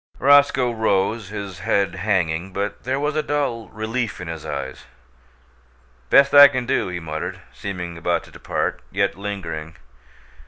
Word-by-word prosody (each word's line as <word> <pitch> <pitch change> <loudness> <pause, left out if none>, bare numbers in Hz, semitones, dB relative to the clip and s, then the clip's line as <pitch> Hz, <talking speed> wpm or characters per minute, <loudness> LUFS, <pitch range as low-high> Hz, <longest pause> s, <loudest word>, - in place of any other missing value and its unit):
Roscoe 140 -2 +4
rose, 110 -1 0
his 100 -4 -6
head 95 0 +1
hanging, 95 -3 -1
but 100 +3 -4
there 130 +2 0
was 150 +1 -1
a 155 - +2
dull 140 -7 -2
relief 110 +2 -3
in 90 - -7
his 80 -2 -6
eyes. - - -5 1.2
"Best 140 0 +5
I 145 0 +11
can 130 -3 -3
do," 120 - 0
he 90 -1 -4
muttered, 80 -1 -5
seeming 90 -4 -6
about 85 +1 0
to - - -16
depart, - - -3
yet - - 0
lingering. 85 -6 -6
100 Hz, 150 wpm, -22 LUFS, 90-125 Hz, 1.2 s, I